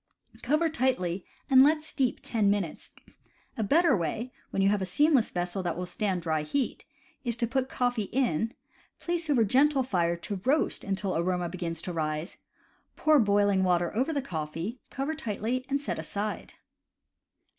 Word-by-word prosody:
Cover 305 +6 +2
tightly 200 - -1 0.2
and 260 -2 +7
let 305 +2 +3
steep 270 -5 -1
ten 215 -4 +1
minutes. 200 -6 -2 0.7
A - - -3
better 330 - +4
way, 225 +8 -3 0.2
when 195 - 0
you 195 - +5
have 205 -1 +1
a - - 0
seamless 280 - +3
vessel 175 +2 -2
that 175 -2 -2
will 180 - -3
stand 185 -1 -2
dry 160 -2 0
heat, 255 - -2 0.4
is 240 -3 -1
to 235 - +1
put 260 +2 -1
coffee 245 -5 -1
in, 230 - +1 0.5
place 345 -2 -2
over 255 -6 +4
gentle 270 +5 +3
fire 175 -8 +1
to 185 +3 -5
roast 285 +6 +1
until 195 -1 -2
aroma 175 +1 0
begins 170 -2 -4
to 180 - -3
rise, 155 +1 -3 0.6
pour 310 -1 +4
boiling 205 -3 +3
water 175 0 +1
over 260 +8 +1
the 285 -4 -1
coffee, 165 - -4
cover 275 +4 -2
tightly, 250 -2 -2
and 280 +1 +1
set 285 - -3
aside. 210 +1 -4
210 Hz, 165 wpm, -28 LUFS, 180-265 Hz, 0.7 s, and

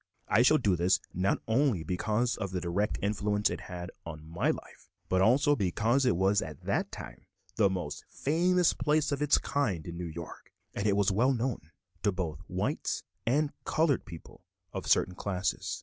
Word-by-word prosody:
I 110 - +4
shall 155 +5 +6
do 105 -9 +2
this 90 +2 +3
not 95 +3 0
only 115 - +2
because 110 +8 0
of 100 -3 -4
the 90 0 -2
direct 90 +4 -1
influence 105 0 +1
it - - -4
had 90 0 -7
on 80 -2 -8
my 85 +2 0
life, - - -5 0.2
but 95 0 +2
also 135 +8 +4
because 115 +5 +1
it 125 - +3
was 95 +3 +3
at 75 -3 -7
that - - -1
time - - -9 0.3
the 105 -3 +5
most 90 -6 -4
famous 175 +4 +2
place 150 0 +1
of 140 0 -1
its 150 -1 +4
kind 105 - -1
in 85 -1 -6
New 90 - -4
York, 85 0 -9 0.2
and 100 +1 +1
was 100 0 +3
well 125 +7 +3
known 120 - -3 0.3
to 105 - +2
both 85 -6 -3
white - - -2 0.2
and 145 +4 +2
colored 155 -5 +1
people 85 -2 -12 0.3
of - - -5
certain 90 - +3
classes. 95 0 -2
100 Hz, 180 wpm, -30 LUFS, 90-130 Hz, 0.3 s, shall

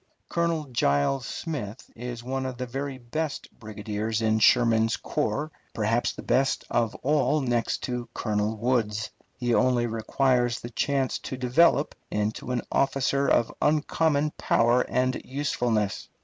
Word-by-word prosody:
Colonel 170 -2 0
Giles 115 - +1
Smith 125 - -5
is 120 0 -6
one 130 +1 -2
of 130 -2 -6
the 125 - -3
very 135 +2 -4
best 140 +5 -4
brigadiers 110 0 -3
in 110 -1 +2
Sherman's 115 -1 +4
corps, 150 +1 -2 0.2
perhaps 115 +2 +1
the - - -9
best 135 +1 +1
of 115 -2 +1
all 150 +2 +2
next 120 -3 0
to 125 -2 -3
Colonel 105 0 -1
Woods. 110 -2 0 0.3
He 120 -1 0
only 125 0 +3
requires 120 +2 +1
the 120 - -8
chance 135 0 0
to 130 - -6
develop 140 +4 +3 0.2
into 105 +3 -2
an 125 -2 -1
officer 140 0 +1
of 120 - +2
uncommon 150 0 +2
power 120 +2 +3
and 130 +1 0
usefulness. 120 -7 -1
125 Hz, 135 wpm, -26 LUFS, 115-135 Hz, 0.3 s, Sherman's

